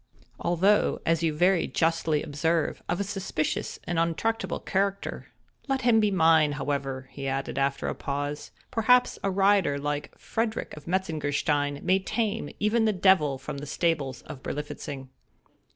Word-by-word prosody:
although, 190 +5 +2
as 165 0 +2
you 165 -1 +2
very 175 +3 +2
justly 165 -2 +1
observe, 160 +3 0
of 175 - 0
a - - +1
suspicious 195 -6 -2
and 175 -2 -1
untractable 185 +3 -1
character; 200 +1 -2 0.4
let 270 -1 0
him 235 -2 +5
be 210 -1 +3
mine, 160 -5 +4
however," 135 -2 -3
he 140 -1 -5
added, 135 0 -2
after 140 0 0
a - - -1
pause, 145 +1 -4 0.2
"perhaps 250 +1 +3
a 195 - +1
rider 195 -6 +3
like 145 +1 -4
Frederick 225 0 -3
of 150 0 -12
Metzengerstein, 145 -5 0
may 190 +1 +3
tame 215 +2 -2
even 220 +2 +2
the 215 - +3
devil 180 -7 +4
from 140 +2 -6
the 145 - -7
stables 150 -4 -1
of 130 - -9
Berlifitzing." 140 -2 -6
165 Hz, 150 wpm, -27 LUFS, 145-195 Hz, 0.4 s, him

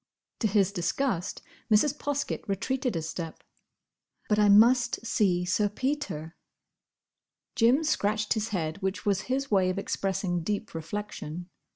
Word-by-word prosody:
To 225 - +2
his 200 -2 +2
disgust, 190 +1 -1 0.3
Mrs. 260 +7 +4
Poskett 290 -1 -2
retreated 250 +4 -1
a 165 - -2
step. 160 +1 -6 0.9
"But 210 0 +3
I 210 -1 +5
must 235 +3 +5
see 185 -6 +2
Sir 205 +3 +1
Peter." 210 - -3 1.2
Jim 245 +7 +4
scratched 215 -7 +1
his 220 -1 -2
head—which 185 0 -3
was 200 -2 +2
his 275 0 -1
way 190 -2 +4
of 185 - -2
expressing 190 -2 -1
deep 205 +5 -3
reflection. 175 0 -6
205 Hz, 130 wpm, -28 LUFS, 180-235 Hz, 1.2 s, I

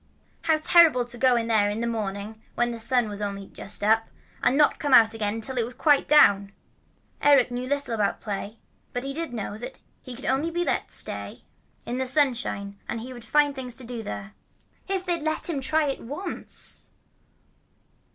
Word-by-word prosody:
How 320 -1 +4
terrible 310 -5 +5
to 240 0 -3
go 255 -1 +4
in 230 -1 0
there 215 -3 +2
in 210 +2 -3
the 235 - -1
morning, 215 -1 -4
when 240 0 +1
the 230 - -6
sun 245 +1 +1
was 205 0 -6
only 200 -1 -4
just 200 - -8
up, 220 +2 +3 0.3
and 255 +3 +2
not 300 - +5
to - - -15
come 290 -5 +3
out 225 -1 +6
again 210 -1 -2
until 245 +3 -3
it - - +2
was 245 +2 -7
quite 290 +1 +3
down! 200 -9 +5 0.7
Eric 275 -4 +5
knew 245 +1 -4
little 285 -3 -1
about 210 -3 0
play, 205 +1 -5 0.4
but 245 - -3
he 275 0 -4
did 325 -2 -4
know 215 -2 -5
that 250 +3 -7
if - - -32 0.2
he 255 - -8
could 265 - -9
only 275 +5 +1
be 345 +1 -1
let - - -1
stay - - 0
out - - -19 0.4
in 245 - -3
the 260 0 -1
sunshine 245 -8 +1 0.2
he 245 +3 -7
would 240 -2 -10
find 290 +5 +2
things 255 -3 -5
to 260 - -5
do 235 -1 -5
there. 210 -1 -7 0.5
If 380 -1 -2
they'd 350 -2 0
only 310 - -8
let 315 0 0
him 305 -6 -1
try 310 +3 +2
it 275 -2 -2
once! 340 +10 -7
245 Hz, 210 wpm, -25 LUFS, 220-285 Hz, 0.7 s, out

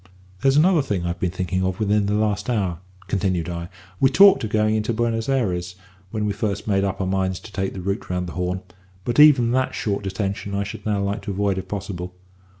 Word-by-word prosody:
"There's 135 +1 +4
another 170 +1 +5
thing 100 -10 -2
I've 85 0 -3
been 90 - 0
thinking 95 +1 -2
of 95 -1 -1
within 105 -1 +2
the 105 - +1
last 105 +1 0
hour," 95 -8 0 0.3
continued 95 -3 -1
I. 85 0 -5 0.3
"We 135 - +5
talked 195 +4 +6
of 110 - -2
going 110 0 +2
into 110 +1 0
Buenos 115 +1 -1
Ayres 90 -9 -1 0.3
when 105 0 -2
we 105 - 0
first 100 -1 -3
made 100 -2 +2
up 100 -1 -2
our 95 - 0
minds 95 -1 0
to 105 - -12
take 95 -1 -3
the 95 - -5
route 100 +2 -3
round 90 0 -1
the 85 - -6
Horn; 90 +1 -2 0.4
but 120 +3 0
even 135 -6 +7
that 130 +1 0
short 100 -1 -2
detention 100 0 -3
I 100 - 0
should 100 +2 -7
now 100 -2 0
like 100 +2 -2
to - - -7
avoid 100 -1 0
if 95 - -8
possible. 90 -2 -5
100 Hz, 225 wpm, -23 LUFS, 95-110 Hz, 0.4 s, even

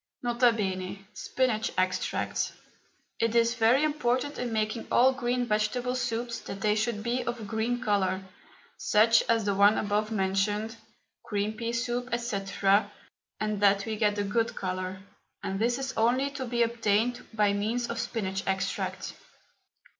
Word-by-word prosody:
N.B. 205 -6 +1
SPINACH 245 -4 -1
EXTRACT. 185 0 -1 0.7
It 230 0 +1
is 235 0 +4
very 240 +4 +4
important 290 -2 0
in 245 -1 -2
making 215 +1 -1
all 260 +2 +5
green 245 -1 -1
vegetable 235 +3 0
soups 235 -1 -2
that 195 - -8
they 210 0 +3
should 215 0 -1
be 245 +2 -1
of 240 0 -3
a - - -7
green 220 +4 -1
colour, 195 -2 +1 0.5
such 225 +2 +4
as 225 -2 +3
the 200 - +1
one 200 +2 +5
above 210 +1 0
mentioned 205 +2 0 0.5
green 205 +1 -1
pea 230 0 -3
soup, 240 +1 -2
&c., 235 -4 -2 1.0
and 215 -1 -2
that 200 -1 +4
we 220 -1 -2
get 210 -1 +1
a 205 - +1
good 225 +3 0
colour, 185 0 -4 0.4
and 195 0 -2
this 240 +2 +1
is 270 -1 -3
only 255 +5 +2
to 265 -2 -5
be 240 0 +2
obtained 230 +1 +1
by 210 -2 +2
means 225 +4 -1
of 235 - -4
spinach 200 -5 -2
extract. 190 0 -2
225 Hz, 150 wpm, -28 LUFS, 205-240 Hz, 1.0 s, all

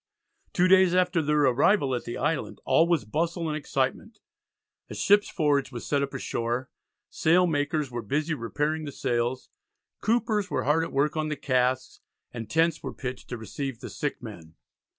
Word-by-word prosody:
Two 180 0 +3
days 185 -1 +5
after 180 -2 +2
their 150 0 +2
arrival 140 - +3
at 120 - -3
the 120 - -5
island 150 0 -2
all 165 - +4
was 170 -9 +1
bustle 165 - -1
and 155 - -2
excitement. 145 - -2 0.7
A - - -7
ship's 205 +1 +3
forge 145 -6 +1
was 120 -2 -7
set 140 -1 +1
up 140 0 -2
ashore; 120 0 -3 0.4
sail 175 +3 +3
makers 150 -3 -1
were 120 0 -3
busy 150 +9 -1
repairing 150 +4 -2
the 145 - -5
sails; 120 0 -2 0.5
coopers 215 -3 +1
were - - -1
hard 155 +4 +2
at - - -5
work 140 +3 +1
on 155 -1 -1
the 150 - -2
casks; 130 -2 0 0.3
and 115 -2 -7
tents 165 -1 +2
were - - -6
pitched 125 -1 -6
to 120 - -4
receive 125 +2 -5
the - - -8
sick 145 -4 -4
men. 85 -8 -10
150 Hz, 175 wpm, -27 LUFS, 130-165 Hz, 0.7 s, days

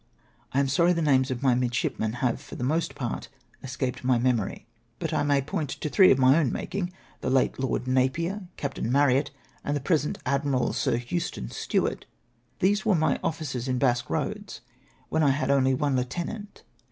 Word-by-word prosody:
I 135 - +1
am 140 - +2
sorry 170 +7 +3
the 170 - -1
names 130 -3 +3
of 130 0 -3
my 130 -2 +4
midshipmen 120 -2 -1
have 120 -2 +1
for - - -10
the - - -5
most 155 +6 0
part 120 -4 -4 0.3
escaped 130 -1 -4
my 125 -1 +3
memory, 120 -4 0 0.3
but - - -3
I - - +1
may 145 -2 +2
point 145 +1 -3
to 150 - -4
three 190 +4 +6
of - - +5
my 130 0 +6
OAvn 155 -6 +2
making 185 -2 -3 0.2
— - - -30
the - - -1
late 130 0 +2
Lord 130 -1 -1
Napier, 165 +10 0
Captain 135 -5 -3
Marryat, 140 0 +3 0.3
and 145 0 -1
the - - -2
present 150 +1 0
gallant 140 +2 0
Admiral 130 -4 +1
Sii^ - - 0
Houston 120 - -3
SteAvart. - - -1 0.5
These 200 +2 +2
Avere 200 -3 +2
my 155 -3 +1
officers 140 -6 -3
in 130 -1 0
Basque 120 -1 +1
Eoads, 205 - -3 0.5
Avhere 160 - +2
I 145 - +4
had 140 +1 +1
only 130 -1 +3
one 145 -1 0
lieutenant. 175 - -4
135 Hz, 190 wpm, -26 LUFS, 130-160 Hz, 0.5 s, three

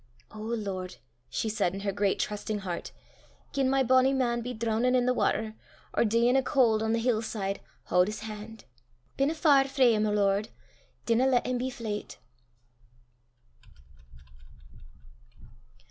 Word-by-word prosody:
"O 215 - -10
Lord," 205 -5 -4 0.3
she 220 - -2
said 205 -4 0
in 195 - -5
her 200 0 -1
great 200 0 0
trusting 210 0 -3
heart, 175 -2 -4 0.6
"gien 270 -1 +1
my 270 0 +3
bonnie 260 +2 +4
man 240 -2 0
be 250 +2 -5
droonin' 235 +2 0
i' 250 -1 +2
the 250 - +3
watter, 220 -3 0 0.4
or - - +3
deein' 235 +3 +3
o' 270 - +4
caul' 240 -5 +2
on 220 - 0
the 230 - +2
hill 230 -1 +1
side, 200 -3 -3 0.2
haud 180 +2 +2
's 215 - -6
han'. 220 0 -8 0.5
Binna 280 +4 +1
far 285 -4 +4
frae 260 -3 +4
him, 215 0 +1
O - - 0
Lord; 200 0 +1 0.6
dinna 235 +3 +3
lat 255 -2 +2
him 250 -1 -1
be 255 +1 -2
fleyt." 220 -4 -6
225 Hz, 150 wpm, -28 LUFS, 210-255 Hz, 0.6 s, bonnie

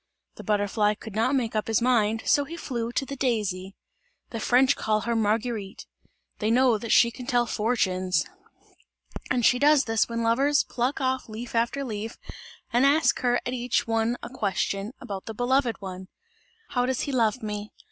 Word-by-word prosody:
The - - -11
butterfly 210 0 +1
could 220 0 -10
not 230 +6 +1
make 235 -4 -1
up 215 - -1
his 225 -2 +2
mind; 225 -3 +2
so 285 - +3
he 330 +4 -8
flew 235 -7 -3
to 270 - -1
the 275 - -6
daisy. 205 -7 -2 0.6
The 230 - -4
French 255 +4 +4
call 215 0 0
her 235 +1 -1
Marguerite; 215 -1 -1 0.5
they 215 - 0
know 245 -1 +4
that 230 +1 -4
she 235 - +5
can 245 +1 -10
tell 240 -1 +2
fortunes, 185 -8 0 1.0
and 245 -3 +1
she 250 - +4
does 295 0 +5
this 225 0 +1
when 230 0 -2
lovers 275 +6 +3
pluck 255 +3 -2
off 260 -2 -1
leaf 230 +3 -7
after 235 +4 0
leaf 220 -1 -5 0.6
and 240 +2 +4
ask 285 +3 +4
her 245 -1 +2
at 245 - -2
each 245 0 0
one 225 +1 0
a - - -6
question 200 -2 -2
about 195 -2 -7
the 220 - -6
beloved 245 0 +1
one: 185 -1 -7 0.6
"How 245 -1 0
does 260 -1 -1
he 285 - -3
love 235 -2 +1
me? 210 0 -4
230 Hz, 180 wpm, -26 LUFS, 215-250 Hz, 1.0 s, she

